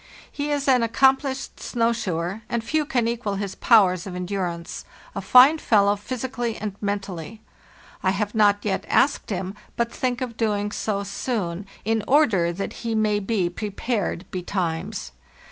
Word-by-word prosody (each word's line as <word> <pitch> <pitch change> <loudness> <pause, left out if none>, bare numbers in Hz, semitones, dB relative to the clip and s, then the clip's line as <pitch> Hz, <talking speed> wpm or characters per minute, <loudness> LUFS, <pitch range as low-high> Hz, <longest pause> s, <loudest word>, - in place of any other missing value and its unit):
He 290 0 -3
is 285 -1 -1
an 255 -2 +5
accomplished 265 +3 +1
snow 230 -1 +1
shoer, 185 -2 -3
and 235 -1 -1
few 310 +5 0
can 240 -5 +1
equal 230 -4 -2
his 195 -1 -3
powers 190 -6 +4
of 180 - -6
endurance—a 180 - -5
fine 270 +5 +7
fellow, 205 -5 +3
physically 240 +1 -4
and 210 -2 -4
men 205 0 0
tally. 190 +2 -8 0.6
I 190 - +2
have 205 +2 -1
not 205 -2 +3
yet 195 -2 0
asked 280 - +2
him, 190 -1 -3 0.2
but 235 0 0
think 250 0 -2
of 240 -3 -4
doing 210 -2 0
so 200 -2 -2
soon, 195 -3 -3 0.2
in 225 -1 +1
order 225 - +4
that 195 +3 -4
he 230 -1 -2
may 215 -1 +2
be 195 -3 0
prepared 200 0 -3
betimes. 175 - -3
210 Hz, 155 wpm, -24 LUFS, 195-240 Hz, 0.6 s, fine